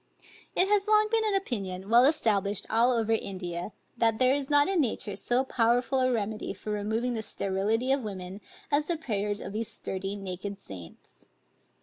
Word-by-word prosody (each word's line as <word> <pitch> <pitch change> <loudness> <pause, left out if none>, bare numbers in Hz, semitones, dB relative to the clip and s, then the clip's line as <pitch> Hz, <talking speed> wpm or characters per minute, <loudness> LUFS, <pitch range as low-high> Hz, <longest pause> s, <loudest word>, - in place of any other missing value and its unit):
It 370 - +4
has 410 0 +2
long 430 0 +4
been 450 -1 +3
an 425 -2 +2
opinion, 195 - -3
well 235 +3 +6
established 205 - +1
all 230 +3 +4
over 225 -2 +1
India, 180 -4 -3 0.2
that 225 -1 +2
there 255 +1 +4
is 280 -1 -1
not 290 -1 +5
in 380 -4 +2
nature 215 -5 -2
so 245 +5 +1
powerful 245 +1 +2
a 255 0 +3
remedy 215 -2 -2
for 215 - -6
removing 220 +4 -1
the 225 - -2
sterility 215 +5 -1
of 275 0 +2
women, 190 -1 -6 0.3
as 295 +1 +2
the 345 - 0
prayers 210 -7 -2
of 190 - -6
these 220 +1 -2
sturdy 195 +1 -4
naked 195 0 -6
saints. 90 - -12
225 Hz, 180 wpm, -28 LUFS, 200-265 Hz, 0.3 s, well